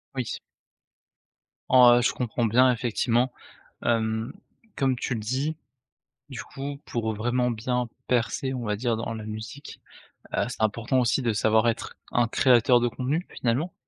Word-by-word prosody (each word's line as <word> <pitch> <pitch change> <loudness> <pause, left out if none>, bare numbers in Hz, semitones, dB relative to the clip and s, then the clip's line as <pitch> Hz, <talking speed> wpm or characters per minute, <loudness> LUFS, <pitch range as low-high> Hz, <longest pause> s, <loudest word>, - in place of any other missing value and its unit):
Oui. 125 -3 -3 1.3
Han, 125 -2 +7
heu, - - +3
je 120 - +1
comprends 120 -1 -1
bien 125 +4 +5
effectivement, 120 +1 0 0.5
hem, 110 0 0 0.4
comme 130 -2 +1
tu 125 - -2
le 115 - -2
dis, 135 +8 -2 0.7
du - - -6
coup, 140 +1 -7
pour, 110 -2 -2
heu, - - -5
vraiment 120 +3 0
bien 125 +2 -2 0.2
percer, 125 +2 0
on 125 -2 -4
va 105 -2 -1
dire, 115 +1 0
dans 115 0 -4
la 110 -1 -7
musique, 110 +6 -8 0.5
heu, - - +1
c'est - - -8
important 115 +4 +1
aussi 120 +2 +2
de 120 -2 +1
savoir 110 +2 +3
être 115 0 -3 0.2
un 120 -1 +3
créateur 120 0 +4
de 120 - +2
contenu 135 +9 -2
finalement. 130 +9 -1
120 Hz, 160 wpm, -26 LUFS, 115-130 Hz, 1.3 s, Han